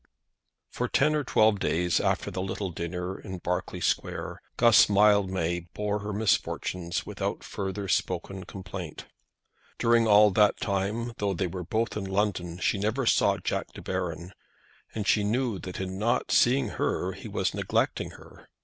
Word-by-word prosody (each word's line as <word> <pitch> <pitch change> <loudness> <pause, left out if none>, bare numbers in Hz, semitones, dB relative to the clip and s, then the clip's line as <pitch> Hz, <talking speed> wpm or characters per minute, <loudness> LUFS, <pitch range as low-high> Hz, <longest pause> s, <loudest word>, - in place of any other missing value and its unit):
For - - -2
ten 150 +3 +3
or 150 -1 +1
twelve 110 -5 +3
days 90 0 +1
after - - 0
the 95 - -3
little 95 0 -3
dinner 90 +2 -4
in 95 -3 -7
Berkeley 90 0 -3
Square - - -2 0.2
Guss 115 -4 +6
Mildmay 95 -4 +2
bore 105 0 -1
her 105 +1 -5
misfortunes 90 -4 -1
without - - -4
further 100 0 -4
spoken 95 0 -1
complaint. 90 -3 -7 0.7
During 115 -1 +3
all 105 0 +7
that 105 +2 +4
time, 105 +4 -1
though 100 -2 0
they 95 - -1
were 90 +1 -4
both 110 +6 -1
in 105 -2 -3
London, 95 -3 -1
she 95 +2 0
never 110 +6 0
saw - - +3
Jack - - -3
De - - -9
Baron, 90 -2 -3 0.6
and 105 -2 -2
she 105 - +3
knew 115 -1 0
that 90 - -7
in 95 0 -4
not 115 +3 0
seeing 130 +3 +4
her - - -1
he - - -9
was - - -1
neglecting - - 0
her. - - -16
100 Hz, 160 wpm, -27 LUFS, 90-105 Hz, 0.7 s, all